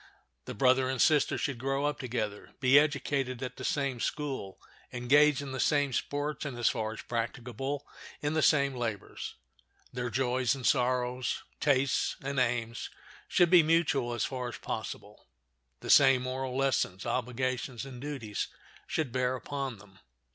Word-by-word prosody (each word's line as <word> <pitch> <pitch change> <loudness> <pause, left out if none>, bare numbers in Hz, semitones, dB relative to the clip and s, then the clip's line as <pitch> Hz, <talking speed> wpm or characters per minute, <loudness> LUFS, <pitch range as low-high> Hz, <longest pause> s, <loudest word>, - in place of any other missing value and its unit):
The - - -6
brother 130 +3 +3
and 130 -1 -2
sister 150 +3 +4
should 135 -4 -2
grow 135 +2 0
up 150 - -1
together, 110 -5 -4
be 130 +2 +7
educated 140 -3 -1
at 125 -1 -5
the - - -7
same 140 -4 -1
school, 135 -9 -3 0.3
engage 140 +4 +4
in 135 - -6
the 130 - -4
same 145 -2 +2
sports, 145 +3 -2
and, 140 -5 -5
as 120 - +3
far 110 -3 -2
as - - -9
practicable, 125 +4 -3 0.3
in 145 +1 -1
the 155 - +2
same 140 -3 +4
labors. 115 -5 -4 0.6
Their 125 -1 -2
joys 125 0 +1
and 130 -3 -7
sorrows, 125 -1 +1 0.2
tastes 135 -2 +2
and 135 0 -1
aims, 115 -2 -1 0.4
should 175 -1 +3
be 180 -2 +9
mutual 150 -6 +2
as 120 - 0
far 125 -2 -4
as 120 - -6
possible. - - -6 0.5
The - - -1
same 135 -2 +7
moral 130 0 -3
lessons, 130 -8 0
obligations, 125 +1 -2
and 125 -2 -9
duties 135 -8 -4 0.4
should 155 -6 -1
bear 130 +1 0
upon 135 -1 -4
them. 95 -2 -18
130 Hz, 155 wpm, -30 LUFS, 120-140 Hz, 0.6 s, be